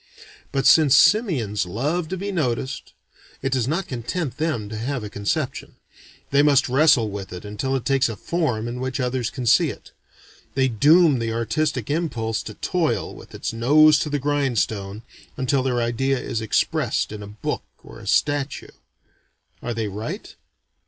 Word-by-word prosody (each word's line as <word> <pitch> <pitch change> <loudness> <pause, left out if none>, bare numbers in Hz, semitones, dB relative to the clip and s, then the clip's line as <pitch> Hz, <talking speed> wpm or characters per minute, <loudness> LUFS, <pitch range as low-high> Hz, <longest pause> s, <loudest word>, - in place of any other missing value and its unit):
But 135 -1 -1
since 155 -5 +6
simians 130 - +3
love 150 - -1
to 190 - -4
be 200 +2 -4
noticed, 130 -6 -2 0.5
it 135 - -1
does 130 -3 +1
not 170 +6 -1
content 130 +3 -4
them 150 -9 -1
to 110 - -6
have 125 +2 -3
a 105 - -7
conception; 130 +8 -3 0.6
they 140 +1 +5
must 145 -2 +4
wrestle 130 -4 +4
with 100 -1 -6
it 90 +2 -8
until 110 +6 -2
it 130 - -3
takes 135 -2 +2
a 115 - -4
form 125 -7 -1
in 120 +1 -5
which 130 +1 -3
others 125 -1 -1
can 125 - -6
see 115 - +4
it. - - -10 0.6
They 135 -1 +3
doom 145 - +4
the 115 -1 -2
artistic 115 +3 -1
impulse 120 -9 -1
to - - -7
toil - - -1
with - - -13
its - - -4
nose 150 +6 +5
to 150 - -2
the 145 - 0
grindstone, 115 - -1 0.3
until 135 +1 +1
their 125 -2 0
idea 120 +3 0
is 115 -2 -3
expressed 110 - 0
in 105 -1 -7
a 100 - -8
book 105 +1 -4 0.2
or - - -12
a - - -11
statue. 145 -1 0 0.9
Are 120 -1 -4
they 110 -2 -2
right? 110 - -6
130 Hz, 170 wpm, -23 LUFS, 115-145 Hz, 0.9 s, since